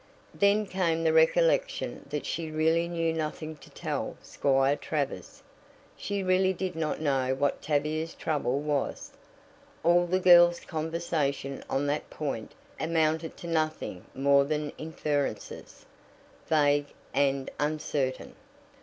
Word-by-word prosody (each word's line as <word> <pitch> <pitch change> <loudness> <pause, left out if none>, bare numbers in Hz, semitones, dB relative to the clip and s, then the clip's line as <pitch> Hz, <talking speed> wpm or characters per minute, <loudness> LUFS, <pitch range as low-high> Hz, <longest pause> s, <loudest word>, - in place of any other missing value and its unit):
Then 205 +1 +3
came 170 -4 0
the 160 -1 +3
recollection - - +2
that 145 0 -3
she 165 -1 -3
really 160 +2 +2
knew 165 -1 0
nothing 155 0 -4
to - - -16
tell - - -4
Squire 135 0 +2
Travers 145 -2 -4 0.5
she 200 -1 -3
really 185 0 +3
did 185 -1 -4
not 160 -2 -2
know 135 -4 +1
what 140 +1 0
Tavia's 155 +2 -1
trouble 140 -4 -1
was. 145 -2 -2 0.7
All 175 +1 +4
the 185 +2 +1
girl's 175 -1 +7
conversation 155 -4 -2
on 135 +2 0
that 145 +1 -2
point 135 -7 -4 0.3
amounted 160 0 0
to 170 - -8
nothing 155 - -2
more 140 +1 +4
than 150 +1 -2
inferences, 150 -3 -3 0.6
vague 145 -2 +3 0.3
and 140 -1 +1
uncertain. 145 -3 -2
155 Hz, 120 wpm, -28 LUFS, 145-170 Hz, 0.7 s, girl's